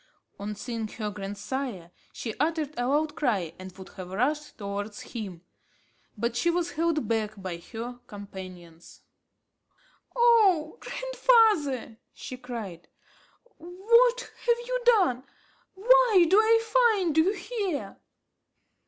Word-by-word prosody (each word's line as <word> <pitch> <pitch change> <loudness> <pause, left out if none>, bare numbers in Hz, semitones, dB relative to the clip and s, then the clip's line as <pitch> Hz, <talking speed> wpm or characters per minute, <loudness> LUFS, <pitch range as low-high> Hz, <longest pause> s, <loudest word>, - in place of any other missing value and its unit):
On 210 +1 -4
seeing 230 0 -4
her 210 -1 -5
grandsire, 200 -1 -5 0.2
she 225 - -5
uttered 310 -1 0
a 245 0 -1
loud 295 +3 +1
cry 200 - -1
and 185 0 -8
would 190 -1 -11
have 185 -1 -9
rushed 290 +10 -1
towards 205 0 -5
him, 195 -7 -6 0.7
but 235 +2 -2
she 345 - +1
was 345 0 0
held 320 -6 0
back 215 -2 -1
by 185 -3 -5
her 235 +7 -8
companions. 185 -5 -11 1.1
"Oh 435 -8 +4
grandfather!" 435 - +2 0.2
she 255 - -7
cried, 230 -9 -8 0.7
"what 465 +9 +3
have 475 0 -1
you - - -2
done? 365 - +4 0.5
why 455 -3 +5
do 370 - +4
I 455 +1 +4 0.3
find 355 -6 -1
you 330 +5 +4
here?" 400 - -4
260 Hz, 120 wpm, -27 LUFS, -, 1.1 s, why